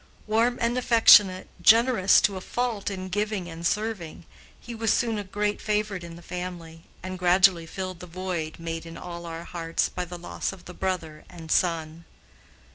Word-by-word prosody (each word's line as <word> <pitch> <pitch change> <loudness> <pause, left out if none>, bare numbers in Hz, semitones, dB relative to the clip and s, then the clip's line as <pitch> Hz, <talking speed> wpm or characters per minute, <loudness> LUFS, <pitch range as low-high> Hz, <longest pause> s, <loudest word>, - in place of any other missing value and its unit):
Warm 230 +3 +2
and 240 +1 +1
affectionate, 210 -6 +6
generous 225 -3 +6
to 200 - +1
a 185 - -5
fault 235 -2 -2
in 185 -2 -5
giving 205 -1 -2
and 165 0 -8
serving, 195 -4 -2 0.3
he 240 - -9
was 225 -1 0
soon 225 -2 +1
a - - -4
great 205 +2 -2
favorite 210 -3 -1
in 170 -1 -9
the 170 - -13
family, 170 -2 -7 0.2
and 185 0 -6
gradually 180 -1 +4
filled 185 0 -6
the 180 - -9
void 170 -3 -4
made 165 0 -5
in 165 - -9
all 170 -1 -8
our 165 0 -6
hearts 165 -1 -2
by 180 - -4
the 175 0 -8
loss 175 - -4
of 190 -2 -13
the 180 - -9
brother 165 -5 -4
and 165 -3 -9
son. 165 -1 0
185 Hz, 180 wpm, -26 LUFS, 170-210 Hz, 0.3 s, affectionate